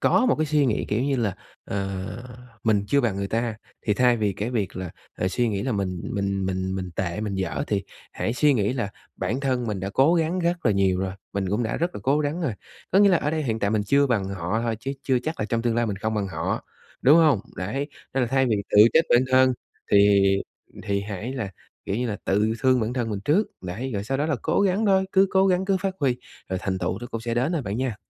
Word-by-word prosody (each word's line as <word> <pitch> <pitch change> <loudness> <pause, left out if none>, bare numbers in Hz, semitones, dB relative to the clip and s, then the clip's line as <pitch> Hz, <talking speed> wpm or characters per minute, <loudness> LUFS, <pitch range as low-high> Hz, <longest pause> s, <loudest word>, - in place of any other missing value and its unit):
có 255 - +3
một 250 - +4
cái 155 - 0
suy 145 -1 +2
nghĩ, 115 - 0
kiểu 110 +4 0
như 140 0 +1
là, 110 -6 0 0.3
ờ, 95 -1 -3 0.6
mình 105 -3 +2
chưa 140 +6 +3
bằng 115 -7 0
người 100 0 -2
ta, 115 +1 -1 0.3
thì 105 - +3
thay 125 0 +4
vì 105 -3 0
cái 105 +5 -3
việc 105 -6 -2
là, 95 -2 -4 0.3
ờ, 90 - 0
suy 120 +5 0
nghĩ 100 -2 -2
là 130 -2 -1
mình 95 -3 -2
mình 100 -1 -1
mình 95 0 -2
mình 95 -1 -4
tệ, 90 +1 -2
mình 105 -2 -3
dở 95 -3 -2
thì 100 -2 0 0.3
hãy 115 - -2
suy 145 +2 +3
nghĩ 105 0 +1
là 120 -6 -2 0.3
bản 125 +4 -2
thân 130 -3 0
mình 105 -4 -3
đã 95 +1 -3
cố 135 +10 +4
gắng 165 +2 +1
rất 175 -2 0
là 105 - +4
nhiều 95 -2 +2
rồi, 95 -1 -2 0.2
mình 95 -2 -1
cũng 105 +4 +1
đã 110 - -2
rất 170 +2 -1
là - - -6
cố 140 +3 +2
gắng 150 +3 -1
rồi. 160 -9 0 0.4
Có 190 - +5
nghĩa 200 0 +7
là 180 - +4
ở 150 - -1
đây 155 0 -1
hiện 115 -5 -1
tại 100 -1 0
mình 110 -1 +1
chưa 140 +3 +4
bằng 105 -7 0
họ 100 +3 -2
thôi, 115 -1 -1
chứ 135 +4 -3
chưa 130 -2 +2
chắc 160 +1 -4
là 105 - 0
trong 115 0 -1
tương 120 -1 +1
lai 120 0 +1
mình 100 -3 -2
không 110 +2 -2
bằng 105 -2 -1
họ, 80 -2 -3 0.4
đúng 145 +5 +7
hông? 155 -10 +5 0.2
Đấy, 135 +10 -3 0.3
nên 135 - +2
là - - +1
thay 135 +1 +2
vì 110 - +2
tự - - +4
trách 160 - +5
bản 120 - +6
thân 130 0 +5 0.4
thì 100 0 +6 0.6
thì 100 0 -1
hãy 105 +4 -5
là, 110 -7 -4 0.3
kiểu 100 - -2
như 125 - -1
là, 105 - -2
tự 105 +3 +2
thương 130 -1 +3
bản 110 +2 -1
thân 120 -3 -2
mình 100 -2 -3
trước, 185 +9 +3 0.2
đấy, 105 +9 -4
rồi 100 - -2
sau 135 +5 -2
đó 145 - +1
là 150 -4 0
cố - - +1
gắng 200 +2 +2
thôi, 190 -1 +4
cứ 190 0 +5
cố 190 0 +4
gắng 185 0 +2
cứ 195 0 +2
phát 190 0 -2
huy, 130 -4 +2 0.3
rồi 95 0 -2
thành 95 -2 -1
tựu 95 +2 -2
nó 120 - -7
cũng 115 - -4
sẽ 115 0 -3
đến 130 +7 +1
thôi 160 -5 -1
bạn 100 0 -3
nha. 125 -4 -2
115 Hz, 265 wpm, -24 LUFS, 100-140 Hz, 0.6 s, nghĩa